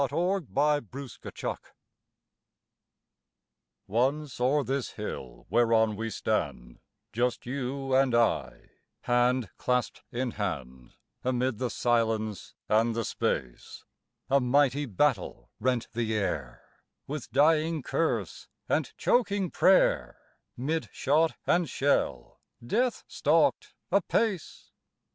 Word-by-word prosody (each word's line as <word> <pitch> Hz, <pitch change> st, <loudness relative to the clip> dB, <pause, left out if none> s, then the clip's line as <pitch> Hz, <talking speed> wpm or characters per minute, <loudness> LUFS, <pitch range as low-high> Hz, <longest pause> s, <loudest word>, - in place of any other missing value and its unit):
ON 175 Hz, +8 st, +1 dB
A 145 Hz, -1 st, +1 dB
BATTLE 135 Hz, +4 st, -8 dB, 0.2 s
FIELD -, -, -4 dB, 2.3 s
Once 130 Hz, +7 st, 0 dB
o'er 140 Hz, +4 st, +3 dB
this 135 Hz, 0 st, -2 dB
hill -, -, -7 dB
whereon 115 Hz, -2 st, +3 dB
we 115 Hz, +2 st, -3 dB
stand, -, -, -2 dB, 0.3 s
Just 120 Hz, +1 st, 0 dB
you 135 Hz, +1 st, -3 dB
and 130 Hz, -2 st, +4 dB
I, 115 Hz, 0 st, 0 dB, 0.3 s
hand 120 Hz, -1 st, +2 dB
clasp'd 125 Hz, -1 st, 0 dB
in 125 Hz, 0 st, -2 dB
hand 65 Hz, -, -5 dB, 0.3 s
Amid 125 Hz, -2 st, 0 dB
the 125 Hz, -1 st, -1 dB
silence, 110 Hz, -4 st, 0 dB
and 110 Hz, +2 st, +2 dB
the 115 Hz, -1 st, -1 dB
space, 60 Hz, -2 st, -3 dB, 0.4 s
A 140 Hz, +1 st, +4 dB
mighty 140 Hz, +2 st, +2 dB
battle 95 Hz, -, 0 dB
rent 125 Hz, -2 st, 0 dB
the 110 Hz, -2 st, -1 dB
air, 75 Hz, -, -3 dB, 0.4 s
With 145 Hz, -2 st, -6 dB
dying 155 Hz, +2 st, +3 dB
curse 165 Hz, +5 st, -1 dB, 0.2 s
and -, -, 0 dB
choking 205 Hz, -7 st, +1 dB
prayer; 190 Hz, 0 st, +3 dB, 0.4 s
'Mid 155 Hz, +6 st, -2 dB
shot 155 Hz, +4 st, +2 dB
and 175 Hz, -4 st, +2 dB
shell 70 Hz, -, 0 dB, 0.3 s
death 240 Hz, -, 0 dB
stalked -, -, +1 dB, 0.2 s
apace. 205 Hz, -8 st, 0 dB
125 Hz, 105 wpm, -28 LUFS, 110-145 Hz, 2.3 s, and